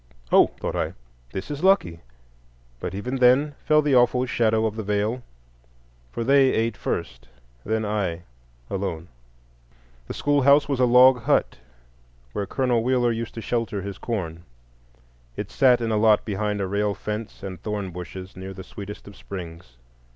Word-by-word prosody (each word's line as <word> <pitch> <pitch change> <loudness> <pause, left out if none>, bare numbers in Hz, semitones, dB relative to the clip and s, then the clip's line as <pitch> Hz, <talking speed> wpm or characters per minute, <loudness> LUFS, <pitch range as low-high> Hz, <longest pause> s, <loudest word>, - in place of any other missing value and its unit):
"Oh," - - +7
thought - - -3
I, - - -2 0.4
"this 95 +8 -5
is 145 +3 -5
lucky"; 140 - +3 0.8
but 90 - -5
even 125 +7 -3
then 130 +4 +4
fell 150 -1 +4
the 145 -2 +1
awful 125 +1 +4
shadow 110 -2 +1
of 110 -1 -1
the 110 - -3
Veil, 105 +4 -1 0.9
for 115 - -3
they 135 +1 +5
ate 115 -1 0
first, - - -4 0.4
then 110 0 -1
I—alone. 85 - -5 1.0
The - - -5
schoolhouse 145 0 +4
was 140 -3 -1
a 125 - +5
log 125 +1 +6
hut, - - +1 0.7
where 100 - -3
Colonel 125 0 +1
Wheeler 125 -1 +2
used 115 0 -4
to 115 - -5
shelter 110 -4 -2
his 100 -1 -6
corn. 85 -8 -4 1.0
It - - -5
sat 125 -3 +4
in 115 -1 -1
a 110 - +2
lot 105 -1 +4
behind 105 0 -2
a 95 - -1
rail 100 +1 0
fence 105 +1 -6
and 95 -2 -7
thorn 105 -3 -4
bushes, 90 +2 -8
near 95 +1 -8
the 95 - -8
sweetest 100 +3 -9
of 100 - -11
springs. 85 -9 -9
105 Hz, 160 wpm, -24 LUFS, 95-125 Hz, 1.0 s, Oh